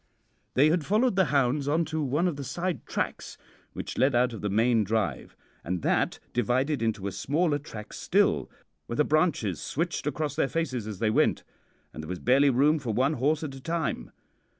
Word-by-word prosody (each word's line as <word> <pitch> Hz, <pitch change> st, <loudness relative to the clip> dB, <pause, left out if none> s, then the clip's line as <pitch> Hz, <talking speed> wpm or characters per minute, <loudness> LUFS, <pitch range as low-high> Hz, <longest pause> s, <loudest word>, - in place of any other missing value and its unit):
"They 145 Hz, +4 st, +5 dB
had 170 Hz, -1 st, +1 dB
followed 215 Hz, -, +2 dB
the 190 Hz, -1 st, +4 dB
hounds 140 Hz, 0 st, +1 dB
on 160 Hz, +3 st, +2 dB
to 160 Hz, 0 st, -3 dB
one 150 Hz, +5 st, +1 dB
of 175 Hz, -, -1 dB
the 140 Hz, -, -6 dB
side 170 Hz, +2 st, -3 dB
tracks -, -, -3 dB, 0.4 s
which -, -, -6 dB
led 135 Hz, -1 st, +3 dB
out 125 Hz, 0 st, +2 dB
of 110 Hz, -, -7 dB
the 105 Hz, -, -1 dB
main 115 Hz, +2 st, +3 dB
drive, 110 Hz, +2 st, -2 dB, 0.3 s
and 90 Hz, -1 st, -3 dB
that -, -, +1 dB, 0.2 s
divided 130 Hz, +4 st, +1 dB
into 110 Hz, -3 st, -1 dB
a 100 Hz, -, -2 dB
smaller 150 Hz, -, 0 dB
track 105 Hz, -7 st, -9 dB
still, -, -, +1 dB, 0.4 s
where 115 Hz, -, -4 dB
the 150 Hz, -, +3 dB
branches 150 Hz, -, +1 dB
switched 165 Hz, -1 st, -2 dB
across 150 Hz, 0 st, -2 dB
their 145 Hz, -3 st, +1 dB
faces 130 Hz, -9 st, -2 dB
as 105 Hz, -3 st, -5 dB
they 110 Hz, +1 st, +1 dB
went, -, -, +2 dB, 0.5 s
and -, -, -7 dB
there 80 Hz, -, -9 dB
was 90 Hz, -, -3 dB
barely 135 Hz, +7 st, +4 dB
room 145 Hz, +5 st, +3 dB
for 125 Hz, -5 st, -3 dB
one 130 Hz, +7 st, +2 dB
horse 150 Hz, +4 st, 0 dB
at 145 Hz, -3 st, -4 dB
a 135 Hz, -, -10 dB
time. 165 Hz, -, -2 dB
135 Hz, 195 wpm, -27 LUFS, 115-155 Hz, 0.5 s, They